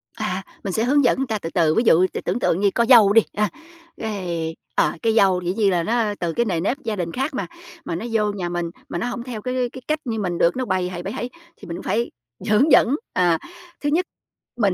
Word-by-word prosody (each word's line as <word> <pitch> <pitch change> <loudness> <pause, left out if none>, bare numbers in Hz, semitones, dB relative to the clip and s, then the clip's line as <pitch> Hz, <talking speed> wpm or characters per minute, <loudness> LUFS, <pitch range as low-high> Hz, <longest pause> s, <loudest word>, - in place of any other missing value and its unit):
À, 210 -4 -3 0.2
mình 195 - -3
sẽ 220 - +1
hướng 280 +4 +3
dẫn 240 - +3
người 270 0 -1
ta 220 -2 -1
từ 165 - -5
từ, 160 -3 +3
ví 230 - +3
dụ 180 -2 +5
t - - -4
tưởng 190 +7 0
tượng 180 - +1
như 200 0 +4
có 235 - +3
dâu 220 -6 +8
đi, 225 - +7
a, 210 0 +1 0.5
cái, 175 -7 -3 0.2
ờ, 150 - +3
cái 225 - +2
dâu 190 -4 +4
dĩ 180 0 -1
nhiên 205 -1 +2
là 175 -2 +1
nó 220 0 0
từ 170 -2 -1
cái 235 - +1
nề 180 -6 0
nếp 205 +10 0
gia 220 -2 -2
đình 175 -4 -3
khác 270 - -2
mà, 260 - -3 0.4
mà - - -3
nó 180 - -4
vô 210 -2 +1
nhà 180 -4 -3
mình 175 -1 -2 0.2
mà - - -3
nó 180 - -2
hổng 245 -1 -4
theo 240 -4 -6
cái 250 +1 -1
cái 260 - -8
cách 310 0 0
như 225 -3 -2
mình 180 -4 -2
được, 170 - +3
nó 255 - -1
bầy 185 -4 0
hầy, 175 -1 -6
bẩy 195 - -4
hẩy, 240 - -4 0.3
thì - - -12
mình 170 0 -5
cũng - - -8
phải 235 +2 -1 0.4
hướng 245 +9 +4
dẫn. 260 - +6 0.2
À, 175 -2 +3 0.4
thứ 290 - 0
nhất 340 +5 +2 0.5
mình, 200 -5 +2
210 Hz, 265 wpm, -22 LUFS, 180-235 Hz, 0.5 s, dâu